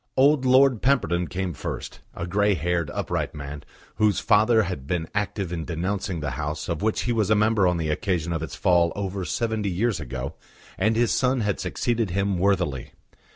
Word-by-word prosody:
Old 140 0 +4
Lord 130 -2 +5
Pemberton 90 - +1
came 90 -1 -3
first, - - -6 0.2
a 85 - -4
grey 100 +3 +2
haired, 85 0 -1
upright - - -3
man, 70 0 -7 0.3
whose 105 -1 +3
father 110 +1 +4
had 90 -8 -5
been 85 -1 -1
active 100 -3 -2
in 80 -2 -3
denouncing 90 +2 -3
the 75 -1 -2
House 75 +1 -3
of 85 -3 -2
which 110 0 0
he 120 - 0
was 110 -4 +1
a 110 - +5
member 105 -2 +3
on 90 -1 +1
the 80 -2 -2
occasion 85 +1 -1
of 80 - -2
its 80 -5 -5
fall 85 -2 +3
over 95 -1 -3
seventy 110 +1 -1
years 100 +2 0
ago, 65 -2 -5 0.4
and 110 +4 +1
his 120 0 +2
son 130 -1 +1
had 105 -3 -1
succeeded 115 -4 -1
him 100 0 0
worthily. 90 -9 0
95 Hz, 190 wpm, -25 LUFS, 85-110 Hz, 0.4 s, Lord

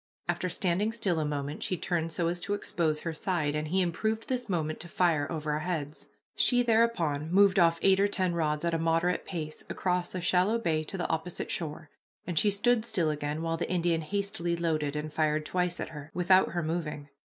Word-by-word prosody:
After 175 +1 -1
standing 185 +5 0
still 195 -7 0
a 155 - 0
moment 145 0 -3
she 185 - -1
turned 165 -1 -1
so 165 +1 0
as 175 +1 -1
to 200 +3 -1
expose 160 -6 -1
her 165 - -3
side, 155 -3 -1
and 150 0 -2
he 190 +4 +1
improved 220 +6 -1
this 250 -3 -2
moment 155 -4 -1
to 175 - -6
fire, 165 -4 +1
over 155 -2 -2
our 150 - 0
heads. 155 -3 -4 0.3
She 245 -1 +4
thereupon 200 -11 +1
moved 195 0 +5
off 170 -1 +5
eight 195 0 +5
or 200 - +4
ten 185 -3 0
rods 155 -1 0
at 170 - 0
a 165 - +1
moderate 165 +2 +1
pace 155 -4 -5
across 180 0 -1
a - - -1
shallow 180 +5 +2
bay 160 -8 0
to 195 - -5
the 175 - -1
opposite 165 +2 -3
shore, 155 -1 -4 0.3
and 170 -3 +1
she 210 - +3
stood 225 +3 +2
still 170 -8 +1
again 150 +1 -3
while 165 0 -1
the 170 - -3
Indian 170 -2 +1
hastily 175 -1 -2
loaded 155 -4 -1
and 150 0 -4
fired 155 -1 +1
twice 180 +1 -1
at - - -4
her, 150 -1 -9
without 185 +1 +4
her 175 -1 -1
moving. 155 -3 -3
170 Hz, 210 wpm, -29 LUFS, 155-185 Hz, 0.3 s, moved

